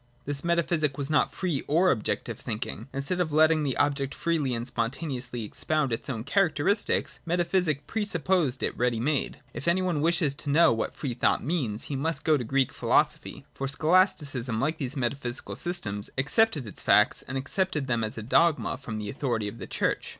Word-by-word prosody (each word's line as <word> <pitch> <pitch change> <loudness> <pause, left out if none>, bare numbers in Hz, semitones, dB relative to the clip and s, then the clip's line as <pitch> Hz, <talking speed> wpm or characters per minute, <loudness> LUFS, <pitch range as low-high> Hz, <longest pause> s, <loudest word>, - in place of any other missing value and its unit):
This 140 -1 -3
metaphysic 170 -4 +1
was 140 +1 -1
not 150 - +3
free 170 -8 -2
or 175 +5 +4
objective 110 - -2
thinking. 115 +5 -4
In 140 0 -3
stead 180 +5 -1
of 170 -3 0
letting 155 +1 +4
the 140 -4 -1
object 140 -1 0
freely 155 -7 0
and 115 0 -3
spontaneously 125 0 -3
expound 145 +4 -1
its 115 - -4
own 115 -4 -3
characteristics, 195 - +1
metaphysic 170 -3 0
pre 220 -1 -2
supposed 175 -7 0
it - - -1
ready 120 -2 0
made. 140 +4 -1
If 140 - -6
any 180 +2 +3
one 175 -5 0
wishes 165 -3 +2
to 145 +1 -5
know 160 0 +5
what 115 - -3
free 135 -5 -3
thought 120 - +1
means, 130 -9 -2
he 145 - -4
must 160 +5 -2
go 155 -2 +4
to 135 - -1
Greek 135 +2 +1
philosophy: - - 0
for 135 - -3
Scholasticism, 145 - +2
like 155 +6 -1
these 140 0 -4
metaphysical 125 0 -2
systems, 105 - -2
accepted 150 - +2
its 105 - -7
facts, - - +4
and 135 - -3
accepted 150 +2 -1
them 120 -3 0
as 110 +1 -2
a 110 - -5
dogma 150 +3 +2
from 115 -6 -6
the 105 -1 -4
authority 120 -4 -2
of 105 +3 -8
the 95 - -6
Church. - - -1
140 Hz, 190 wpm, -27 LUFS, 125-165 Hz, -, know